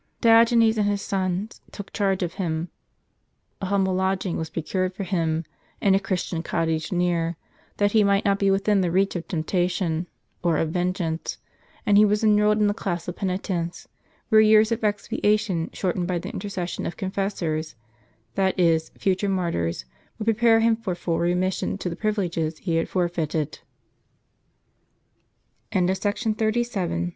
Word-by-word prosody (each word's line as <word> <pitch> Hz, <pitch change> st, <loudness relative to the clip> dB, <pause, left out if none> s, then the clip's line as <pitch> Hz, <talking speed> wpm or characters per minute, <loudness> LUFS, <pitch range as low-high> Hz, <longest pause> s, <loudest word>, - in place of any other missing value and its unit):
Diogenes 230 Hz, -1 st, +5 dB
and 205 Hz, -, +2 dB
his 200 Hz, -1 st, -1 dB
sons 190 Hz, +2 st, -2 dB
took 205 Hz, -2 st, -9 dB
charge 195 Hz, -3 st, +1 dB
of 170 Hz, -1 st, -3 dB
him. 165 Hz, -1 st, -2 dB, 0.9 s
An 190 Hz, -, -2 dB
humble 190 Hz, -1 st, +1 dB
lodging 190 Hz, -1 st, 0 dB
was 160 Hz, 0 st, -3 dB
procured 185 Hz, +3 st, -2 dB
for 195 Hz, -, -4 dB
him, 165 Hz, -3 st, 0 dB, 0.4 s
in 195 Hz, -, +3 dB
a 195 Hz, -, +4 dB
Christian 185 Hz, -3 st, -2 dB
cottage 160 Hz, -1 st, -1 dB
near, 175 Hz, -2 st, 0 dB, 0.4 s
that 205 Hz, 0 st, +2 dB
he 215 Hz, -1 st, +4 dB
might 200 Hz, 0 st, +2 dB
not 200 Hz, 0 st, +2 dB
be 195 Hz, -, +3 dB
within 195 Hz, +1 st, +2 dB
the 180 Hz, -, +1 dB
reach 190 Hz, +3 st, +1 dB
of 170 Hz, -, -4 dB
temptation, 175 Hz, 0 st, -1 dB, 0.3 s
or 170 Hz, -3 st, +2 dB
of 160 Hz, 0 st, 0 dB
vengeance, 175 Hz, -2 st, -2 dB, 0.5 s
and 205 Hz, 0 st, +5 dB
he -, -, +7 dB
was 210 Hz, +1 st, +2 dB
enrolled 210 Hz, 0 st, +4 dB
in 210 Hz, -, +3 dB
the 205 Hz, -, +2 dB
class 175 Hz, -5 st, -4 dB
of 180 Hz, -, -4 dB
penitents, 180 Hz, -3 st, -3 dB, 0.4 s
where 220 Hz, -2 st, +7 dB
years 215 Hz, +1 st, +5 dB
of 230 Hz, 0 st, -1 dB
expiation, 205 Hz, -3 st, 0 dB
shortened 180 Hz, -2 st, -2 dB
by 180 Hz, -1 st, 0 dB
the 170 Hz, -, -5 dB
intercession 185 Hz, -3 st, -4 dB
of -, -, -6 dB
con 190 Hz, -1 st, -3 dB
fessors— 165 Hz, -, -2 dB, 0.6 s
that 190 Hz, -1 st, 0 dB
is, 165 Hz, -2 st, +3 dB
future 195 Hz, +1 st, 0 dB
martyrs 125 Hz, -, -1 dB, 0.2 s
— -, -, -36 dB
would 215 Hz, -, -5 dB
prepare 225 Hz, 0 st, +4 dB
him 225 Hz, 0 st, +4 dB
for 220 Hz, -6 st, -4 dB
full 170 Hz, -1 st, -2 dB
re 175 Hz, +1 st, +2 dB
admission 185 Hz, +2 st, -1 dB
to 180 Hz, -3 st, -3 dB
the -, -, -4 dB
privileges 175 Hz, -7 st, -1 dB
he 165 Hz, -2 st, -1 dB
had 165 Hz, -, -1 dB
forfe 175 Hz, -2 st, -1 dB
185 Hz, 155 wpm, -24 LUFS, 170-205 Hz, 0.9 s, he